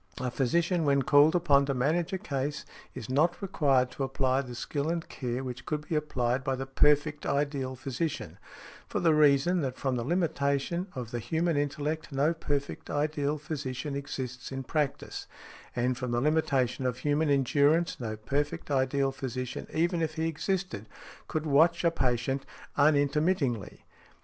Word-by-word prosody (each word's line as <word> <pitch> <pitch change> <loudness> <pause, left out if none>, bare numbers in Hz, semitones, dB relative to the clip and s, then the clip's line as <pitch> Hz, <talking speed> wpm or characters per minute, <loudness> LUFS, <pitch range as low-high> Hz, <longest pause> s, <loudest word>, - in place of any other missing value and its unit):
A 125 -1 -2
physician, 170 +7 +1
when 140 -2 +3
called 145 +5 +5
upon 140 -5 +4
to 140 - 0
manage 155 +7 +1
a 190 - -1
case, 145 -5 -3 0.3
is 120 -4 -6
not 155 +7 +2
required 135 -9 +2
to 135 - -4
apply 135 0 +1
the 125 -3 -8
skill 145 +5 -2
and 170 0 -2
care 125 -1 -4
which 125 -1 -6
could 150 0 -3
be - - -3
applied 130 -4 0
by 135 0 0
the 135 +1 -4
perfect 145 +2 +2
ideal 140 -2 -1
physician, 135 +4 -4 0.5
for - - -2
the 165 -2 +4
reason 150 +4 +4
that 130 -2 -3
from 130 -2 -1
the 120 - -2
limitation 160 +1 0
of 120 -3 -5
the 120 - -2
human 165 +6 0
intellect 145 +2 -2
no 145 +4 +2
perfect 145 -3 -3
ideal 150 0 0
physician 145 -2 -4
exists 130 -2 -5
in 135 0 -4
practice, 150 +1 -2 0.5
and, 125 +1 0
from 125 -1 -3
the 120 0 +1
limitation 135 -3 +1
of 125 -1 -2
human 150 +3 +1
endurance, 145 +5 +3
no 110 -3 -4
perfect 145 +7 -2
ideal 135 0 +2
physician, 130 -2 -5
even 170 +1 +1
if 160 -1 -1
he 160 0 0
existed, 165 - -2 0.4
could 155 0 -2
watch 160 +4 +4
a 170 - +4
patient 130 -2 0 0.3
unintermittingly. 145 - +1
140 Hz, 160 wpm, -29 LUFS, 130-155 Hz, 0.5 s, called